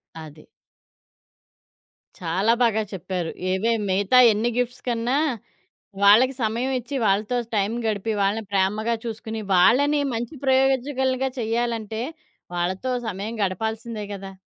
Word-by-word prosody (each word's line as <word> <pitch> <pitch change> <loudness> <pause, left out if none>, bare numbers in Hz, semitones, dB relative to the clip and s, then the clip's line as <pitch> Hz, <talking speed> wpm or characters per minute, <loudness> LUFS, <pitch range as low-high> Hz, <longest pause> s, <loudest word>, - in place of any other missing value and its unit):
అది. 155 -1 -11 1.7
చాలా 185 +6 +1
బాగా 220 -2 +2
చెప్పారు. 180 -2 -3 0.2
ఏవే 205 +5 +1 0.2
మిగతా 200 +6 +3
ఎన్ని 220 +3 0
గిఫ్ట్స్ 245 0 -2
కన్నా, 240 +3 0 0.9
వాళ్ళకి 230 +7 +6
సమయం 235 +4 -1
ఇచ్చి, 270 +4 -6
వాళ్ళతో 210 +5 +1 0.2
టైం 205 +1 +1
గడిపి, 215 +1 -1
వాళ్ళని 210 +3 0
ప్రేమగా 210 +4 +1
చూసుకొని, 225 -1 -5
వాళ్ళని 275 +11 +4
మంచి 240 +7 -4
ప్రయోజకులుగా 265 0 +2
చెయ్యాలంటే 225 -1 -2 0.5
వాళ్ళతో 185 +8 -2 0.2
సమయం 215 +3 -4
గడపాల్సిందే 220 +3 -3
గదా! 195 0 -8
220 Hz, 110 wpm, -23 LUFS, 195-245 Hz, 1.7 s, వాళ్ళకి